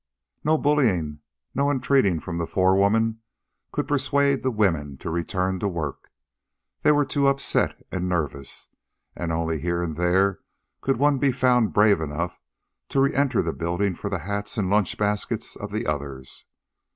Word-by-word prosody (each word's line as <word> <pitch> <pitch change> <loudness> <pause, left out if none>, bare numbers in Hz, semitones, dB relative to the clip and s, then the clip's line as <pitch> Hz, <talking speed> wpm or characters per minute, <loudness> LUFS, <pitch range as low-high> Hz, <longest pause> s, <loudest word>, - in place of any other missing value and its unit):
No 155 +1 +3
bullying 105 - +1 0.3
nor 140 +2 +2
entreating 130 - +2
of 85 -2 -3
the 85 - -2
forewoman 100 +4 +2 0.5
could - - -2
persuade 140 0 +2
the 130 - +1
women 80 - 0
to 80 - -5
return 90 +2 -1
to 100 - 0
work. 80 -7 -4 0.7
They - - +5
were 145 -1 +3
too 140 +1 +1
upset 140 0 +1
and 90 0 -2
nervous, 75 -6 -3 0.5
and 85 -1 -3
only 80 -1 -1
here 85 +2 -1
and 80 -3 -3
there 95 +3 +2 0.4
could 135 -2 +1
one 145 +1 +3
be 135 +1 +3
found 125 -3 +2
brave 105 -4 +4
enough 80 +3 -3 0.5
to 135 - +1
re 135 0 +3
enter 135 -4 +2
the 80 - -2
building 85 +4 -1
for 100 - -5
the 100 - -1
hats 100 +1 -3
and 95 -3 0
lunch 105 -2 +2
baskets 105 0 -1
of - - -6
the - - -2
others. 70 -3 -4
100 Hz, 165 wpm, -24 LUFS, 85-130 Hz, 0.7 s, They